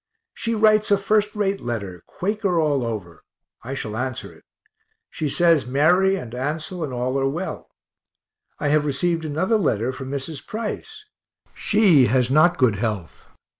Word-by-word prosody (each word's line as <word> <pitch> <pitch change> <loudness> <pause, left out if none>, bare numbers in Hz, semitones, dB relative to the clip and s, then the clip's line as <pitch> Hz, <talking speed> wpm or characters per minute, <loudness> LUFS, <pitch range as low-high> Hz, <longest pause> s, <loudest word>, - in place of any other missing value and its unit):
She 230 0 -2
writes 215 0 +4
a 200 - +5
first 210 +1 +1
rate 200 -1 -1
letter, 100 -7 -5
Quaker 195 -2 -1
all 145 -5 +1
over 100 -8 -5 0.4
I 130 +4 -6
shall 110 -5 -5
answer 130 +1 -4
it. - - -20 0.7
She 155 - -3
says 165 -3 +3
Mary 175 +9 +3
and 125 -11 -7
Ansel 155 +7 -3
and 145 - -4
all 125 +2 -1
are 135 0 +1
well. 170 +7 -5 0.9
I 145 - -1
have 150 0 +3
received 165 +3 -1
another 185 +9 +1
letter 120 - 0
from 130 0 -8
Mrs. 140 +2 -5
Price 235 - -6 0.5
she 190 - +4
has 125 +1 +2
not 165 +5 +4
good 120 -8 +3
health. 105 -6 -4
150 Hz, 155 wpm, -22 LUFS, 125-190 Hz, 0.9 s, a